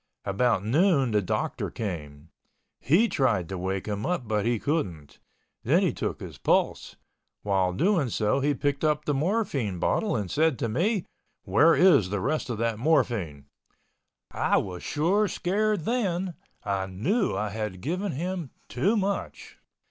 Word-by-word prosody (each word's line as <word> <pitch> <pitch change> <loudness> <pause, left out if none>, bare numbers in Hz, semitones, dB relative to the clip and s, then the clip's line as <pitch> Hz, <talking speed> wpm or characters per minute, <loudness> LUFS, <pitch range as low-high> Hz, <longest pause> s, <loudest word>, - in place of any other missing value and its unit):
About 100 0 +1
noon 140 - +3
the 105 -1 +2
doctor 90 - -2
came. 80 -7 -6 0.5
He 180 - +3
tried 115 - +1
to 95 - -4
wake 95 +1 -2
him 105 0 -3
up, 175 -10 -2
but 105 0 0
he 120 -1 +2
couldn't. 95 - -3 0.4
Then - - +3
he - - +1
took - - -3
his - - -9
pulse. - - 0 0.5
While 95 -3 +1
doing 165 - +2
so, 105 +4 +1
he 145 +1 +1
picked 140 +1 -1
up 150 -1 +1
the 145 - +1
morphine 145 - -1
bottle 205 - 0
and 100 -5 -3
said 155 -3 +2
to 115 - -1
me, 180 - 0 0.4
"Where 150 - +4
is 145 - +5
the 100 +1 -1
rest 140 +7 -1
of 120 - -2
that 115 -1 -1
morphine?" 115 - 0 0.9
I - - +1
was 90 -2 -3
sure 190 +8 +1
scared 205 +2 0
then, 190 -4 -1 0.3
I 100 -2 -1
knew 170 - 0
I 105 0 -1
had 105 -3 -4
given 180 - -2
him 175 +1 -3 0.2
too 195 - +1
much. 200 0 -3
130 Hz, 155 wpm, -26 LUFS, -, 0.9 s, is